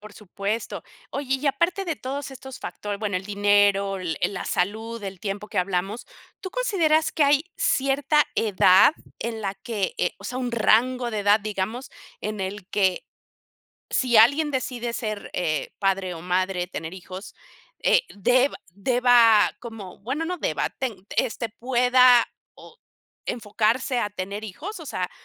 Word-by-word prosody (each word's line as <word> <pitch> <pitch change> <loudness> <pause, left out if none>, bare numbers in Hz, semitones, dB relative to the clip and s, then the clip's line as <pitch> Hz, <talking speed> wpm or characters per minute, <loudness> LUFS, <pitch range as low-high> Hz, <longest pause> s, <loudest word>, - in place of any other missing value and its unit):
Por 210 0 -12
supuesto. 205 +2 -4 0.3
Oye, 275 -1 -1
y 280 +3 -5
aparte 340 +7 +1
de 335 -4 -1
todos 275 0 -5
estos 265 0 -10
factor 205 -1 -5
bueno, 205 -3 -1
el 185 - -4
dinero, 200 -1 +3
l 170 -3 -3
eh, - - +2
la 200 - -5
salud, 220 +5 -2
el 190 -2 -7
tiempo 200 +1 -4
que - - -3
hablamos, 190 +4 -1 0.3
¿tú 375 - -6
consideras 320 -10 +2
que 310 - +2
hay 285 +1 +4
cierta 275 +2 +2
edad 190 +1 +5 0.3
en 230 -1 -3
la 195 -2 -2
que 205 -3 -3
eh, 180 - 0
o 200 - -14
sea, 250 +5 -4
un 250 -1 -2
rango 240 +2 +2
de 215 - -1
edad, 205 +1 +5
digamos, 215 +4 -4 0.3
en 215 -1 -4
el 190 0 -5
que 190 -4 +1 0.9
si 245 -3 +3
alguien 280 +8 +6
decide 245 -3 -3
ser, 215 -3 -4
eh, 155 -5 -1
padre 195 -2 0
o 165 - -8
madre, 180 0 0
tener 165 -2 -6
hijos, 185 +2 -9 0.5
eh, - - +5
deba 250 +7 +2
deba 235 +1 +5
como? 225 -6 -9
Bueno, 265 +10 -3
no 360 +2 -3
deba - - -1
ten 220 -8 -4
este, 235 -2 0
¿pueda, 250 +1 +5
ah, - - -2 0.3
o 465 - -15 0.5
enfocarse 230 +3 0
a 210 -3 -1
tener 200 +1 -5
hijos, 325 - -7
o 320 - -9
sea, 180 -6 -3
220 Hz, 160 wpm, -24 LUFS, 195-255 Hz, 0.9 s, alguien